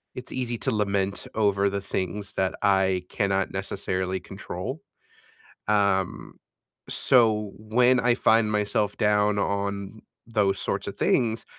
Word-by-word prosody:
it's 125 - -8
easy 120 -2 -2
to - - 0
lament 100 -1 -1
over 100 -2 +2
the 100 0 -3
things 100 +1 -4
that 95 -1 0
I 95 -2 +2
cannot 100 -2 0
necessarily 95 -1 -3
control, 100 - -6 0.9
um, 100 -3 0 0.5
so 110 -5 +3
when 125 +4 +3
I 125 -1 +3
find 110 -2 +3
myself 105 -1 0
down 105 -1 +2
on 100 +1 -3 0.2
those 105 -4 +1
sorts - - -2
of - - -6
things, 115 -2 +1
100 Hz, 125 wpm, -26 LUFS, 95-110 Hz, 0.9 s, so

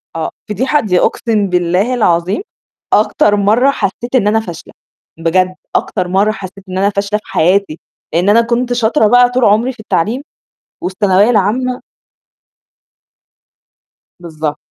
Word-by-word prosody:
آه، 160 -1 -2 0.2
فضيحة؟! 260 +8 +1
دي 185 -8 +1
أقسم 215 -4 0
بالله 180 +6 +1
العظيم 180 - +1 0.5
أكتر 210 0 +3
مرّه 220 +7 +3
حسيت 240 +2 -3
إن 220 -5 +3
أنا 220 +1 +2
فاشلة، 175 -7 -9 0.5
بجد 185 +3 +1 0.2
أكتر 180 - -1
مرّه 195 +4 +2
حسيت 195 -2 -9
إن 185 - -4
أنا 200 +1 +2
فاشلة 200 +1 -2
في - - -30
حياتي، 180 -1 +1 0.3
لإن 175 +4 +2
أنا 225 +3 +5
كنت 240 +1 -1
شاطرة 235 0 +2
بقى 245 +2 +5
طول 250 -1 +1
عمري 225 +6 +2
في 245 - -23
التعليم 220 +4 -1 0.6
والثانوية 190 +2 +2
العامة. 245 +4 0 2.4
بالضبط. 155 -3 -5
205 Hz, 135 wpm, -14 LUFS, 185-235 Hz, 2.4 s, أنا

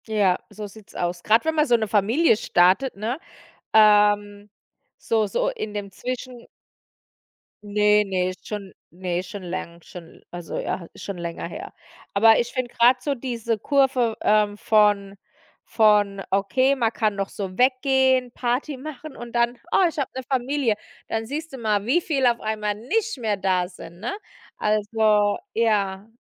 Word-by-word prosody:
Ja, 205 -4 +2
so 210 - -8
sieht's 205 0 -14
aus. 175 0 -2
Grad 225 +5 +3
wenn 320 - +1
man 305 -1 +3
so 245 - +4
'ne 220 -1 -2
Familie 225 - +3
startet, 190 +6 +2
ne? 225 +8 -3 0.5
Ähm, 205 -1 +4 0.5
so, 220 -2 0
so, - - -1
in 465 - -4
dem 205 -1 -5
Zwischen 250 +3 -6 1.2
Ne, 210 0 +3
ne, 185 -1 -1
schon 205 -3 -7 0.2
ne, 180 0 -3
schon 190 +1 -9
läng 175 -1 -6
schon 170 -2 -13
also 175 -1 -6
ja, 170 - -3
ist - - -12
schon 200 -2 -5
länger 170 -1 -5
her. 365 - -8 0.4
Aber 225 +2 +6
ich 240 0 -1
finde 255 -2 -3
grad 250 +2 +4
so 285 - 0
diese 235 -3 -3
Kurve, 260 -3 +2
ähm, 210 -1 +2
von 205 -2 +2 0.5
von: 210 -3 +2
„Okay, 255 +8 +2
man 230 -4 +1
kann 215 -3 0
noch 195 0 -3
so 190 -2 -6
weggehen, 260 -1 +3
Party 255 +4 -2
machen“, 300 +1 -9
und 240 0 -9
dann, 240 +1 +1
„Oh, 380 - +4
ich 330 - -6
habe 275 - -1
'ne 260 - -4
Familie“, 260 -2 0 0.3
dann 225 0 -2
siehst 310 +4 -5
du - - -6
mal, 210 -3 0
wie 295 +9 +2
viel 275 -6 0
auf 240 -1 +3
einmal 215 -1 -2
nicht 425 - -2
mehr 215 -3 -1
da 185 -2 +1
sind, 175 -2 -12
ne? - - -3 0.5
Also 210 -1 +2 0.2
ja, 205 -3 0
215 Hz, 160 wpm, -23 LUFS, 200-255 Hz, 1.2 s, Aber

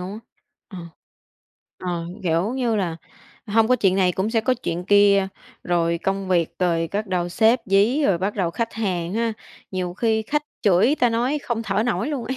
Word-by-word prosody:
luôn 185 +2 -6
á 215 - -7 0.5
ờ, 190 - -9 1.0
ờ, 175 -2 -4 0.2
kiểu 175 +6 0
như 240 -4 0
là 175 -5 -1 0.5
hông 220 +2 +2
có 255 - +4
chuyện 190 -5 +2
này 180 -2 +3
cũng 195 +5 -1
sẽ 225 -1 +2
có 255 +3 +1
chuyện 175 -7 -4
kia, 200 -1 +4 0.4
rồi 170 -1 +1
công 195 0 -2
việc, 170 -2 +1
rồi 170 -2 +1
bắt 210 +1 -2
đầu 180 -2 -1
sếp 225 +7 +3
dí, 210 +10 +3
rồi 180 -4 +2
bắt 195 +3 -2
đầu 185 -5 -1
khách 230 +6 -3
hàng 185 -4 -2
ha, 230 0 0 0.4
nhiều 180 -2 -3
khi 220 0 +1
khách 295 +6 -1 0.2
chửi, 205 +8 +4
ta 245 -2 +4
nói, 245 +6 0
không 230 -2 -2
thở 200 +1 0
nổi 245 +2 -1
luôn 275 -6 -3
ấy. 260 - -3
200 Hz, 200 wpm, -22 LUFS, 180-230 Hz, 1.0 s, có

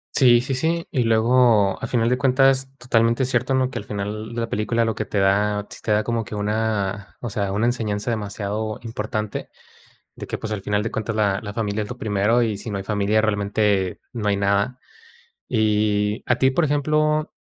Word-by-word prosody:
Sí, 120 -3 +6
sí, 130 +2 -3
sí, 165 +5 -1
y 130 - +1
luego, 115 -3 +3
a - - -1
final 115 -2 +1
de 125 +1 +1
cuentas, 135 0 +3
totalmente 120 0 +2
cierto, 130 +1 0
¿no? 130 0 +1
Que - - -4
al - - -8
final 105 +2 -5
la 115 -1 -1
película 115 +2 0
lo 115 - 0
que 110 - -4
te 100 - -4
da 105 +1 +2
sí - - -8
te - - -6
da 105 0 +3
como 115 0 -1
que 105 - -8
una 105 -1 -2
o 120 -4 -5
sea, 100 -1 -1
una 105 +4 0
enseñanza 115 -2 -1
demasiado 105 0 -3
importante, 110 -2 -4 0.7
de - - -8
que, - - -3
pues, 110 -1 -5
al 100 -2 -3
final 105 +1 0
de 115 - -3
cuentas, 110 0 -3
la 100 -3 +1
la 100 - -6
familia 105 -1 -2
es 105 - -6
lo 125 - -7
primero, 105 +3 +1
y 110 -3 -1
si 110 - -7
no 100 - -3
hay 95 - -6
familia, 105 +1 +1
realmente 100 -2 0
no 110 -4 -2
hay 100 - +2
nada. 100 +5 0 0.7
Y, 105 -1 +1
a 120 - +2
ti, 130 +1 +4
por 155 +5 +1
ejemplo, 150 +1 +1
110 Hz, 205 wpm, -22 LUFS, 105-120 Hz, 0.7 s, Sí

